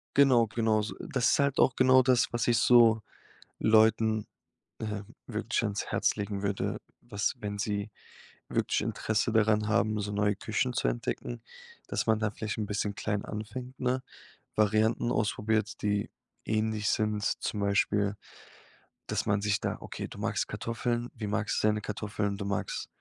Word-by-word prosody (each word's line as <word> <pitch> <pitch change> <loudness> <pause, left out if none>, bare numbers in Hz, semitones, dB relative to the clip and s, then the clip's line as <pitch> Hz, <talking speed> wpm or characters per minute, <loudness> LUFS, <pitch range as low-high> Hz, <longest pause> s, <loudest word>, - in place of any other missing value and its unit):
Genau, 130 -5 +5
genau. 110 0 +1
So 105 - -5
das 140 -9 +1
ist - - +2
halt 140 -1 +2
auch 125 - +4
genau 130 0 +6
das, 125 -1 +3
was 120 - -1
ich 120 -1 +4
so 115 -2 +6 0.6
Leuten, 110 0 +4 0.5
äh, 105 -2 -4 0.2
wirklich 115 +1 -1
ans 105 -2 -2
Herz - - +1
legen 100 -1 -3
würde, 100 -1 -1 0.2
was 100 +12 -2
wenn 100 -1 -5
sie 105 0 -2 0.6
wirklich - - 0
Interesse 110 +1 0
daran 105 -1 +3
haben, 110 0 +2
so 105 0 -3
neue 105 0 +1
Küchen - - -1
zu - - +1
entdecken, 110 - -3 0.5
dass - - -1
man 110 -1 +3
da 110 -1 +1
vielleicht 110 +1 -5
'n 105 - -1
bisschen 100 0 -2
klein 105 0 -2
anfängt, 115 +5 -6
ne? 130 +1 0 0.5
Varianten 110 +2 +2
ausprobiert, 110 0 0
die 105 -1 0 0.3
ähnlich 110 -1 0
sind, 105 -1 0
zum 105 - -1
Beispiel, 100 0 +1 0.9
dass - - -1
man 100 0 +2
sich 105 -1 +1
da - - -2
okay, - - -6
du - - -11
magst - - -1
Kartoffeln. 120 +1 -2
Wie 105 - -5
magst 105 +1 -1
du - - +3
deine 105 0 +1
Kartoffeln? 105 -1 -3
Du 100 - -4
magst 100 -1 -2
110 Hz, 160 wpm, -29 LUFS, 105-115 Hz, 0.9 s, genau